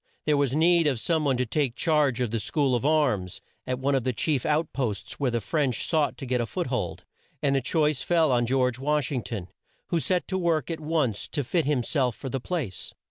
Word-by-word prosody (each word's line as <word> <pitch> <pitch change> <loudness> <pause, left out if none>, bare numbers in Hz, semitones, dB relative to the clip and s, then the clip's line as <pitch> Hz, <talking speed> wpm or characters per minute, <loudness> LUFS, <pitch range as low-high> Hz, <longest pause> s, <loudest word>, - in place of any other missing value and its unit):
There 150 - +3
was 140 -2 +1
need 165 +1 +4
of 135 -5 0
some 155 +5 0
one 135 -3 +2
to 125 - +1
take 130 0 -1
charge 150 -6 +2
of 120 -3 -1
a 115 - +1
school 140 +3 0
of 120 - 0
arms 140 - +1 0.3
at 130 0 -1
one 135 +2 0
of 135 -3 +1
the 130 - 0
chief 140 +2 0
out 155 +1 +1
posts 115 -7 -3
where 140 -3 +1
the 120 -1 0
French 135 - 0
sought 155 -4 +1
to - - -6
get 125 -1 0
a 115 - -2
foot 180 - -3
hold, 90 -7 -2 0.4
and 140 -1 +3
the 135 - +2
choice 150 +1 +1
fell 165 -4 +2
on 120 -1 +2
George 125 -1 +1
Wash 150 0 0
ing 130 -3 -1
ton, 100 -3 -5 0.4
who 170 - +1
set 180 +2 0
to 190 -1 -1
work 165 -4 0
at 165 - -4
once 150 -9 -1
to 145 - -2
fit 165 +6 0
him 140 -4 +1
self 130 -4 0
for 135 - -6
the 135 - -2
place. 140 - -4
135 Hz, 240 wpm, -26 LUFS, 125-155 Hz, 0.4 s, need